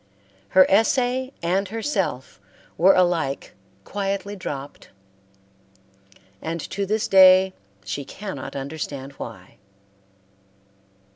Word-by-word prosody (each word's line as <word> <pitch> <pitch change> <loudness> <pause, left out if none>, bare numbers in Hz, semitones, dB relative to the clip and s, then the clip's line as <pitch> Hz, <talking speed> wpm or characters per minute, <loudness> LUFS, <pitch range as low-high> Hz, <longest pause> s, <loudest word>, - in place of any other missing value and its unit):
Her 185 - +9
essay 250 +5 +2
and 190 +4 +1
herself 210 - -3 0.4
were 185 +4 +5
alike 170 -6 0 0.3
quietly 200 - -3
dropped; 145 -7 -7 1.5
and 165 +1 -4
to 200 0 -2
this 215 +2 0
day 190 0 +7 0.3
she 120 +9 -4
cannot 140 -3 -7
understand 140 -1 -5
why. 95 -6 -9
185 Hz, 85 wpm, -23 LUFS, 140-200 Hz, 1.5 s, Her